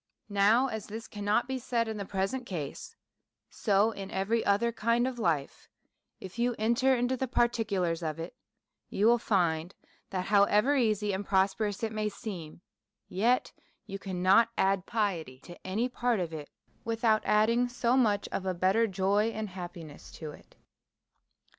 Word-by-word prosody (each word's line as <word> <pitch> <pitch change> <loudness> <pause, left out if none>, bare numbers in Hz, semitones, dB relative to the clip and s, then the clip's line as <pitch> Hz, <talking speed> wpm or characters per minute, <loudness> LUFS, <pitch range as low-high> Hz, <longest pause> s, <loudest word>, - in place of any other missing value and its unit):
Now, 205 +5 +4
as 220 -5 -4
this 220 +2 -7
cannot 210 +3 0
be 265 0 -3
said 235 -2 -1
in 220 -1 -4
the 200 - -4
present 195 +7 -2
case, 155 -7 -6 0.6
so 205 +1 +2
in 195 -3 -7
every 210 +4 0
other 205 +4 +2
kind 235 +2 +1
of 255 -2 -3
life; 160 -9 -1 0.5
if 190 +5 -9
you 240 0 +1
enter 235 +5 +2
into 245 +1 0
the 260 +1 -2
par 240 -1 +3
ticulars 195 -8 -1
of 155 -2 -3
it, 165 +8 -7 0.5
you 205 - 0
will 235 +1 +5
find 175 -5 0 0.3
that, 185 -2 -3
however 210 +6 +4
easy 215 -5 +1
and 190 +2 -2
prosperous 200 +2 0
it 220 - -1
may 215 -1 -1
seem, 180 -8 -8 0.5
yet 235 +7 +1 0.3
you 195 -2 -6
cannot 190 +4 +3
add 195 -1 +1
piety 185 - -2
to 175 +3 -12
any 215 +6 0
part 245 -3 0
of 170 -3 -3
it, 150 -2 -7 0.3
without 225 -1 +2
adding 230 +4 +3
so 245 0 +1
much 215 -6 +2
of 195 - -3
a 185 - -1
better 190 +6 +2
joy 200 +2 +1
and 220 -2 -4
happiness 175 -4 -9
to 155 -2 -7
it. - - -17
210 Hz, 165 wpm, -29 LUFS, 190-230 Hz, 0.6 s, will